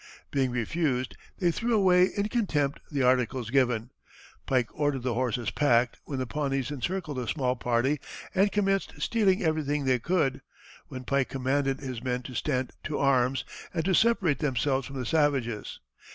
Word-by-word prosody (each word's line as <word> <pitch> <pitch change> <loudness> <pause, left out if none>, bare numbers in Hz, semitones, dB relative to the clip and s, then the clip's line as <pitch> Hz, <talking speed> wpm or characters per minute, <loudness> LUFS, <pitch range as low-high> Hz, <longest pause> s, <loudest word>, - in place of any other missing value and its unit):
Being 135 -2 +1
refused 125 +1 -1 0.2
they 175 -3 +2
threw 230 +6 0
away 180 -3 +5
in 200 +1 +1
contempt 155 - 0
the 140 -3 0
articles 125 -2 +1
given. 125 -3 +1 0.6
Pike 125 -3 +2
ordered 145 -4 -1
the 125 -2 0
horses 120 -2 -1
packed, 120 -4 +2
when 140 - -4
the 130 - -1
Pawnees 135 -1 -2
encircled 150 +1 -3
the 125 -2 -3
small 130 -3 0
party 125 +4 +1 0.3
and 195 +2 +3
commenced 195 -1 0
stealing 205 -3 +2
everything 150 -3 0
they 130 -1 +3
could, 150 -1 0 0.5
when 130 0 -7
Pike 140 0 0
commanded 135 +1 0
his 130 -4 -5
men 125 -1 -1
to 130 - -8
stand 130 -1 -1
to 155 - -2
arms, 130 -1 +2 0.3
and 165 -1 0
to 190 - +2
separate 195 -8 +3
themselves 135 -2 0
from 135 - -9
the 125 - -3
savages. 135 -7 0
135 Hz, 165 wpm, -28 LUFS, 125-160 Hz, 0.6 s, away